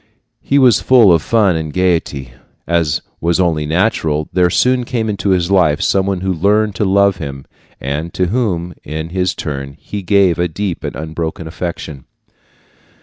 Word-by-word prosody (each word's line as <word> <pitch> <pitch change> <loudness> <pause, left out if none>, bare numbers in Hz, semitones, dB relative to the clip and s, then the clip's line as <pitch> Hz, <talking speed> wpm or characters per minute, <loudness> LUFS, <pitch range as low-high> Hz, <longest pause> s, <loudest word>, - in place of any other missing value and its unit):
He 140 - +1
was 125 -6 +5
full 120 -8 +5
of 85 - +3
fun 105 -2 +2
and 80 -1 -3
gaiety. 80 -8 -1 0.3
As 85 -3 0 0.2
was 85 +2 0
only 80 -5 +1
natural, 80 -3 0
there 90 0 +3
soon 125 +7 +2
came 115 -2 -2
into 100 -1 -2
his 90 -1 +1
life 80 -6 +3
some 95 -1 +1
one 95 -2 -1
who 95 0 -1
learned 105 +5 +1
to 105 - +1
love 100 0 +3
him, 70 -4 -7 0.3
and 75 +5 -4
to 90 - +1
whom, 90 -7 -1
in 80 +2 -5
his 90 +1 -1
turn, 70 -2 -5
he 105 - -6
gave 95 -2 +2
a 90 - +2
deep 90 +2 -4
and - - -4
unbroken 80 +1 -5
affection. 80 -4 -6
90 Hz, 170 wpm, -16 LUFS, 80-100 Hz, 0.3 s, was